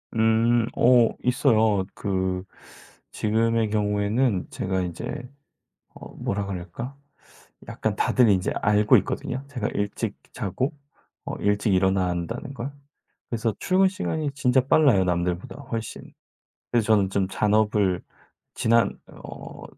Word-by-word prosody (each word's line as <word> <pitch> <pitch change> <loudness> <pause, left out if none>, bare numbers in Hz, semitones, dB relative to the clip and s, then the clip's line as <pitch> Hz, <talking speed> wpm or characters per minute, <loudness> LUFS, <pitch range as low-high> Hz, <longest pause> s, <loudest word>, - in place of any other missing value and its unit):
음 115 +1 +3
어 120 -1 +5
있어요. 110 -6 +3
그 95 -2 -2 0.7
지금의 115 +1 +1
경우에는 105 +1 0
제가 95 0 -2
인제 90 +7 -5 0.7
어 - - -12
뭐라 100 0 -2
그럴까? 100 +8 -6 0.7
약간 - - -2
다들 125 -3 +3
인제 95 -3 +2
알고 105 +1 +5
있거든요 130 +2 -3
제가 125 -7 -3
일찍 100 +1 -2 0.2
자고 125 - -2 0.5
어 - - -4
일찍 105 0 +1
일어난다는 95 - 0
걸. 135 +2 -5 0.6
그래서 115 -2 -1
출근 190 +1 +3
시간이 160 -6 -2
진짜 130 -2 +2
빨라요 135 -10 +4
남들보다 90 +2 -2 0.2
훨씬. 115 -1 -4 0.7
그래서 115 -3 +2
저는 100 -3 +3
좀 95 -1 0
잔업을 105 -2 +1 0.5
지난 115 +1 +2
어 - - -10
110 Hz, 245 characters per minute, -25 LUFS, 95-120 Hz, 0.7 s, 어